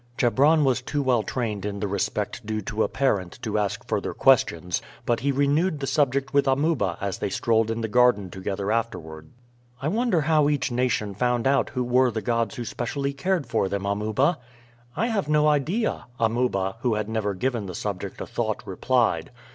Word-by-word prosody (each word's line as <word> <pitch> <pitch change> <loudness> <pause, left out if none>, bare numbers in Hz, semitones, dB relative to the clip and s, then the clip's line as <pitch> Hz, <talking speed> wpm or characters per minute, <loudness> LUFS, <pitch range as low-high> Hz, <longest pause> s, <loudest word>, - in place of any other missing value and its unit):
Chebron 145 +6 +4
was 130 -2 +2
too 145 +3 -2
well 125 -4 +3
trained 110 -4 -3
in 100 -1 -3
the 105 - -1
respect 100 -1 -2
due 110 0 -2
to 105 +2 -3
a - - +3
parent 100 -10 -1
to 110 -2 0
ask 100 -1 -2
further - - -2
questions, 85 0 +3 0.2
but 120 -1 +1
he 140 +4 +1
renewed 145 +4 +1
the 135 - -2
subject 140 -1 +1
with 140 0 +3
Amuba 135 - +1
as 100 -1 -3
they - - -1
strolled 115 +2 +1
in 115 0 -2
the 110 - -1
garden 105 -4 +3
together 100 +2 -3
afterward. 80 -9 -3 0.5
"I 140 +3 -1
wonder 220 -4 +1
how 150 -1 +3
each 140 -3 0
nation 120 -4 0
found 125 +3 0
out 135 +1 +2
who 125 -2 -2
were 125 +1 +3
the 110 -1 -3
gods 115 -2 0
who 120 - -5
specially 140 +5 -3
cared 170 +2 0
for 95 - 0
them, 100 0 -3
Amuba?" 110 - +1 0.6
"I 210 - +1
have 210 -10 -1
no 150 0 +4
idea," 155 - 0
Amuba, 115 -4 0
who 120 -2 +1
had 105 -1 -2
never 110 -3 -1
given 115 0 -2
the 90 - -6
subject 100 -3 -4
a - - -3
thought, - - -2
replied. 115 -11 +1
120 Hz, 190 wpm, -25 LUFS, 105-140 Hz, 0.6 s, Chebron